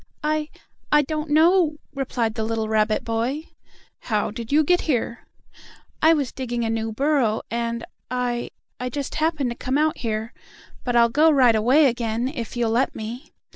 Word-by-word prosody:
"I 305 Hz, 0 st, 0 dB, 0.4 s
I 295 Hz, 0 st, +5 dB
don't 305 Hz, +1 st, -4 dB
know," 320 Hz, +1 st, +4 dB, 0.2 s
replied 245 Hz, -5 st, -1 dB
the 220 Hz, -1 st, -3 dB
little 220 Hz, 0 st, -1 dB
rabbit 215 Hz, 0 st, +1 dB
boy. 235 Hz, +7 st, -2 dB, 0.5 s
"How 215 Hz, -3 st, -1 dB
did 230 Hz, +2 st, -7 dB
you 305 Hz, +2 st, +5 dB
get 355 Hz, +4 st, +3 dB
here?" 235 Hz, -3 st, -1 dB, 0.7 s
"I 320 Hz, -, +6 dB
was 280 Hz, -5 st, -1 dB
digging 240 Hz, -3 st, -3 dB
a 225 Hz, -, 0 dB
new 225 Hz, 0 st, -2 dB
burrow, 260 Hz, -3 st, +1 dB
and 235 Hz, 0 st, -2 dB, 0.2 s
I 245 Hz, -1 st, -2 dB, 0.3 s
I 250 Hz, 0 st, -3 dB
just 280 Hz, +2 st, -4 dB
happened 305 Hz, -6 st, +1 dB
to -, -, -5 dB
come 260 Hz, +3 st, -1 dB
out 310 Hz, +1 st, +1 dB
here. 220 Hz, -1 st, -3 dB, 0.5 s
But 245 Hz, -1 st, -1 dB
I'll 235 Hz, 0 st, +5 dB
go 300 Hz, +7 st, +4 dB
right 260 Hz, -6 st, +5 dB
away 255 Hz, +8 st, +4 dB
again, 235 Hz, -1 st, 0 dB
if 240 Hz, -4 st, -6 dB
you'll 235 Hz, -2 st, +1 dB
let 240 Hz, +4 st, +1 dB
me." 235 Hz, +7 st, -7 dB
245 Hz, 175 wpm, -23 LUFS, 230-295 Hz, 0.7 s, I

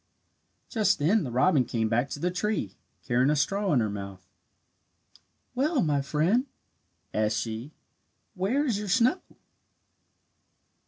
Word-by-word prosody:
Just 210 Hz, -4 st, +2 dB
then 180 Hz, +8 st, +2 dB
the 130 Hz, -, -4 dB
robin 130 Hz, +4 st, +3 dB
came 115 Hz, -2 st, -1 dB
back 120 Hz, +4 st, 0 dB
to -, -, -6 dB
the 180 Hz, +4 st, 0 dB
tree, 180 Hz, -, -2 dB, 0.3 s
carrying 125 Hz, +2 st, +2 dB
a 150 Hz, -, +3 dB
straw 195 Hz, +6 st, 0 dB
in 130 Hz, -5 st, +3 dB
her 110 Hz, -, +1 dB
mouth. 100 Hz, -2 st, -8 dB, 1.3 s
"Well, 280 Hz, -, +1 dB
my 145 Hz, -3 st, +1 dB
friend," 170 Hz, -, +1 dB, 0.7 s
asked 110 Hz, 0 st, +1 dB
she, 115 Hz, +6 st, -4 dB, 0.6 s
"where 215 Hz, +10 st, 0 dB
is 225 Hz, -7 st, 0 dB
your 210 Hz, -, -5 dB
snow?" 240 Hz, -, +3 dB
150 Hz, 130 wpm, -27 LUFS, -, 1.3 s, robin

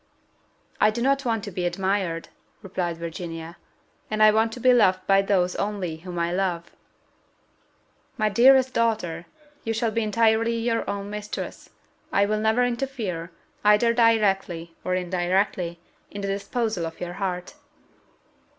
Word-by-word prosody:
"I 215 Hz, -, +5 dB
do 215 Hz, +2 st, -3 dB
not 275 Hz, +2 st, +1 dB
want 225 Hz, -3 st, 0 dB
to 205 Hz, -, -6 dB
be 180 Hz, 0 st, -3 dB
admired," 185 Hz, -2 st, -1 dB, 0.3 s
replied 180 Hz, -3 st, -3 dB
Virginia, 165 Hz, 0 st, -6 dB, 0.5 s
"and 215 Hz, 0 st, +2 dB
I 215 Hz, -, +8 dB
want 220 Hz, +1 st, +2 dB
to 250 Hz, -, -7 dB
be 255 Hz, +1 st, +5 dB
loved 185 Hz, -6 st, +3 dB
by 195 Hz, 0 st, +4 dB
those 185 Hz, -2 st, +1 dB
only 195 Hz, -6 st, -2 dB
whom 175 Hz, +1 st, -8 dB
I 170 Hz, 0 st, 0 dB
love." 175 Hz, -2 st, -2 dB, 1.5 s
"My 215 Hz, -2 st, +2 dB
dearest 260 Hz, +4 st, +5 dB
daughter, 210 Hz, -8 st, -1 dB, 0.4 s
you 225 Hz, -, -1 dB
shall 225 Hz, 0 st, 0 dB
be 230 Hz, -, 0 dB
entirely 225 Hz, +1 st, +2 dB
your 230 Hz, 0 st, -1 dB
own 200 Hz, 0 st, -4 dB
mistress; 210 Hz, 0 st, -6 dB, 0.4 s
I 200 Hz, -, +3 dB
will 210 Hz, +1 st, 0 dB
never 220 Hz, +3 st, +2 dB
interfere, 235 Hz, -9 st, -3 dB, 0.3 s
either 210 Hz, +3 st, +5 dB
directly 195 Hz, -8 st, +2 dB
or 185 Hz, -, 0 dB
indirectly, 180 Hz, -1 st, -1 dB, 0.3 s
in 200 Hz, -, -7 dB
the 200 Hz, -, -3 dB
disposal 200 Hz, -2 st, -2 dB
of 165 Hz, -, -10 dB
your 175 Hz, 0 st, -5 dB
heart." 180 Hz, +1 st, -4 dB
200 Hz, 145 wpm, -25 LUFS, 180-225 Hz, 1.5 s, I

